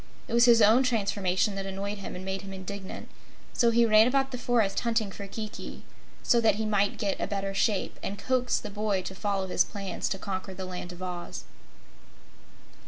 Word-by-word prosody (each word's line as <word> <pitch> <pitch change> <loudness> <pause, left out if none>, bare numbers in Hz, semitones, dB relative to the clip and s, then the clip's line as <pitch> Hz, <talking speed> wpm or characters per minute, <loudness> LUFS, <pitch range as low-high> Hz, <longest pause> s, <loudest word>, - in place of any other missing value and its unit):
It - - -6
was 235 0 +6
his 230 -2 +7
own 220 +5 +6
transformation 200 -5 +1
that 195 0 -4
annoyed 200 +2 -4
him 195 - -6
and 185 +1 -7
made 190 0 -3
him 195 -1 -8
indignant, 190 +1 -7 0.5
so 235 - +4
he 235 0 +4
ran 215 0 +6
about 270 +1 +1
the 250 - -4
forest 230 -6 +1
hunting 230 -4 0
for 200 +1 -7
Kiki, 215 +1 -7 0.4
so 235 - +4
that 220 -3 +4
he 220 +1 -2
might 205 -1 +1
get 200 -2 -1
a - - 0
better 195 -1 -2
shape 200 0 0
and 200 - -4
coax 255 +1 +1
the 210 - -6
boy 205 -2 -1
to 190 - -6
follow 195 0 -1
his 185 - +3
plans 195 -3 -4
to 195 - -2
conquer 190 0 -5
the 190 - -5
Land 180 -1 -6
of 180 +1 -9
Oz. 175 - -5
200 Hz, 200 wpm, -28 LUFS, 190-225 Hz, 0.5 s, his